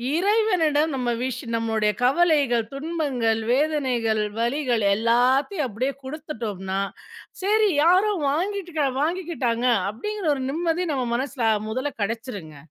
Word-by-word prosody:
இறைவனிடம் 345 Hz, -7 st, +2 dB
நம்ம 250 Hz, -2 st, -1 dB
விஷ் 255 Hz, -1 st, -3 dB
நம்மளுடைய 220 Hz, -2 st, +1 dB
கவலைகள், 275 Hz, -5 st, +3 dB
துன்பங்கள், 275 Hz, -7 st, -1 dB
வேதனைகள், 255 Hz, -7 st, +1 dB, 0.2 s
வலிகள் 240 Hz, -3 st, 0 dB
எல்லாத்தையும் 255 Hz, -, +2 dB
அப்டியே 255 Hz, +6 st, -2 dB
குடுத்துட்டோம்னா! 220 Hz, -, -4 dB, 0.6 s
"சரி, 425 Hz, +1 st, +3 dB
யாரோ 370 Hz, +5 st, +4 dB, 0.2 s
வாங்கிட்டுக்கரா 340 Hz, -3 st, -1 dB
வாங்கிக்கிட்டாங்க!" 300 Hz, -8 st, -1 dB, 0.2 s
அப்டிங்கற 400 Hz, -, -4 dB
ஒரு 265 Hz, -, -4 dB
நிம்மதி 340 Hz, +2 st, 0 dB
நம்ம 255 Hz, -2 st, -1 dB
மனசுல, 265 Hz, -1 st, -3 dB
அ, -, -, -2 dB
மொதல்ல 260 Hz, +5 st, -2 dB
கெடைச்சிருங்க. 205 Hz, -, -5 dB
275 Hz, 110 wpm, -24 LUFS, 230-330 Hz, 0.6 s, யாரோ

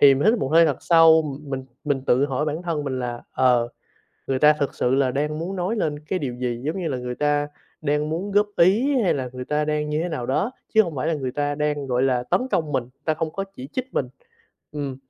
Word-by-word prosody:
thì 140 Hz, -1 st, +8 dB
mình 135 Hz, -, -1 dB
hít 235 Hz, -, +1 dB
một 135 Hz, -, -1 dB
hơi 165 Hz, +1 st, +7 dB
thật 145 Hz, -4 st, 0 dB
sâu. 165 Hz, -1 st, +6 dB, 0.2 s
Mình 135 Hz, -3 st, -5 dB, 0.2 s
mình 140 Hz, -3 st, 0 dB
tự 130 Hz, +3 st, +4 dB
hỏi 135 Hz, +1 st, -1 dB
bản 155 Hz, +2 st, -3 dB
thân 165 Hz, -4 st, -2 dB
mình 130 Hz, -2 st, -2 dB
là, 120 Hz, -1 st, -4 dB
ờ, 125 Hz, -2 st, +3 dB, 0.6 s
người 135 Hz, -1 st, 0 dB
ta 150 Hz, +2 st, +7 dB
thực 145 Hz, -2 st, -2 dB
sự 125 Hz, -, +1 dB
là 135 Hz, -1 st, +2 dB
đang 150 Hz, +3 st, -1 dB
muốn 185 Hz, +4 st, -4 dB
nói 185 Hz, +6 st, -1 dB
lên 150 Hz, -8 st, -1 dB
cái 155 Hz, +5 st, -3 dB
điều 135 Hz, -7 st, -3 dB
gì, 120 Hz, -1 st, -3 dB
giống 155 Hz, +6 st, -2 dB
như 175 Hz, -3 st, -2 dB
là 135 Hz, -, -2 dB
người 125 Hz, 0 st, -4 dB
ta 145 Hz, +1 st, +1 dB, 0.3 s
đang 150 Hz, 0 st, 0 dB
muốn 185 Hz, +6 st, -3 dB
góp 205 Hz, +1 st, +4 dB
ý 225 Hz, +11 st, +4 dB
hay 190 Hz, -, +2 dB
là 130 Hz, -3 st, -3 dB
người 125 Hz, 0 st, -6 dB
ta 150 Hz, +3 st, 0 dB
đang 150 Hz, 0 st, -1 dB
như 150 Hz, +1 st, -1 dB
thế 175 Hz, -, -2 dB
nào 150 Hz, -8 st, -4 dB
đó, 165 Hz, -, 0 dB, 0.2 s
chứ 220 Hz, -, +7 dB
hông 170 Hz, -6 st, -5 dB
phải 135 Hz, +4 st, -1 dB
là 165 Hz, -, +1 dB
người 130 Hz, -4 st, -3 dB
ta 145 Hz, +1 st, -1 dB
đang, 150 Hz, -1 st, -1 dB
gọi 125 Hz, -1 st, 0 dB
là, 130 Hz, -2 st, +2 dB
tấn 125 Hz, -, +1 dB
công 155 Hz, -, 0 dB
mình, 130 Hz, -3 st, 0 dB, 0.2 s
ta 155 Hz, -, +1 dB
không 160 Hz, 0 st, -2 dB
có 195 Hz, -, -3 dB
chỉ 130 Hz, +1 st, -8 dB
trích 255 Hz, 0 st, -4 dB
mình. 130 Hz, -, 0 dB, 0.6 s
Ừm, 140 Hz, -3 st, -4 dB
150 Hz, 260 wpm, -23 LUFS, 130-165 Hz, 0.6 s, thì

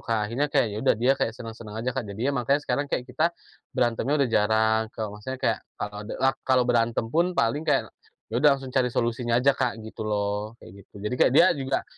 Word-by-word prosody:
Kak. 110 Hz, -2 st, -1 dB
Akhirnya 130 Hz, +7 st, -1 dB
kayak, 135 Hz, -7 st, +1 dB
ya -, -, -5 dB
udah -, -, +3 dB
dia 125 Hz, +4 st, +3 dB
kayak 115 Hz, -3 st, -2 dB
senang-senang 115 Hz, -2 st, -8 dB
aja, 120 Hz, +3 st, -2 dB
Kak. 130 Hz, -5 st, -4 dB
Jadinya, 125 Hz, +7 st, -1 dB
makanya 140 Hz, +4 st, +1 dB
sekarang 145 Hz, 0 st, -1 dB
kayak 125 Hz, -, -2 dB
kita 155 Hz, +7 st, -1 dB, 0.3 s
berantemnya 125 Hz, +4 st, 0 dB
udah -, -, -2 dB
jarang. 110 Hz, +1 st, +3 dB
Kalo 105 Hz, -1 st, -5 dB
maksudnya 130 Hz, +5 st, -5 dB
kayak, -, -, +2 dB, 0.2 s
kalau 105 Hz, 0 st, -5 dB
de -, -, -5 dB
lak 135 Hz, 0 st, +2 dB
kalau 130 Hz, -1 st, +2 dB
berantem 120 Hz, -1 st, +1 dB
pun, 175 Hz, +2 st, +1 dB
paling 145 Hz, +8 st, 0 dB
kayak, -, -, +1 dB, 0.4 s
ya -, -, -3 dB
udah 150 Hz, -, +6 dB
langsung 135 Hz, -1 st, -9 dB
cari 130 Hz, -2 st, +2 dB
solusinya 120 Hz, 0 st, 0 dB
aja, 135 Hz, +3 st, +4 dB
Kak, 125 Hz, -4 st, -1 dB
gitu 110 Hz, -, -10 dB
loh. 105 Hz, +1 st, -2 dB
Kayak 90 Hz, -, -14 dB, 0.2 s
gitu. -, -, -52 dB
Jadi 105 Hz, -, -1 dB
kayak -, -, +5 dB
dia -, -, +8 dB
juga 135 Hz, -1 st, -2 dB
120 Hz, 220 wpm, -26 LUFS, 110-135 Hz, 0.4 s, dia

